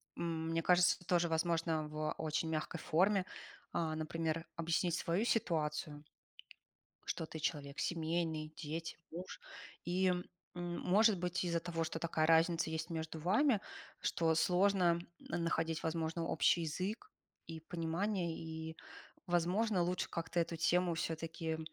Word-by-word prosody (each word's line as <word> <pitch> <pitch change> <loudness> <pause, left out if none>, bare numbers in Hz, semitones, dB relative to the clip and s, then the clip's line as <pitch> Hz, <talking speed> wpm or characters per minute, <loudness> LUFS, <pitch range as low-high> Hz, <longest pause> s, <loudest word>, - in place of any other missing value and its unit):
мне 165 -1 -1
кажется, 180 +1 +5
это 180 - -18
тоже 175 -1 +3
возможно 165 -1 +1
в 155 0 -2
очень 160 +1 -1
мягкой 160 +2 -2
форме, 190 +5 +3 0.5
а, 160 -2 0
например, 160 +1 -2
объяснить 170 +1 +1
свою 180 +6 0
ситуацию, 155 -8 0 1.0
что 160 - -2
ты 160 - -7
человек 145 -2 -2
семейный, 160 -2 -1
дети, 165 +2 -4 0.2
муж. 180 - -7 0.4
И 185 +1 +2 0.4
может 180 +4 +3
быть, 180 +1 -1
из-за 170 -1 +1
того, 165 -1 -2
что 165 - -3
такая 160 -1 +1
разница 165 0 +4
есть 160 +2 -3
между 160 -1 -4
вами, 215 - +3 0.4
что 165 -1 +2
сложно 180 -1 +4 0.2
находить, 165 -1 -1
возможно, 165 0 -1
общий 170 - +3
язык 190 - -3 0.4
и 160 -1 -6
понимание, 170 +2 -1
и, 160 0 -6 0.5
возможно, 180 +3 +2
лучше 180 +1 0
как-то 170 +1 -1
эту 165 0 -1
тему 175 +1 +2
всё-таки, 160 0 -3
165 Hz, 125 wpm, -36 LUFS, 160-175 Hz, 1.0 s, кажется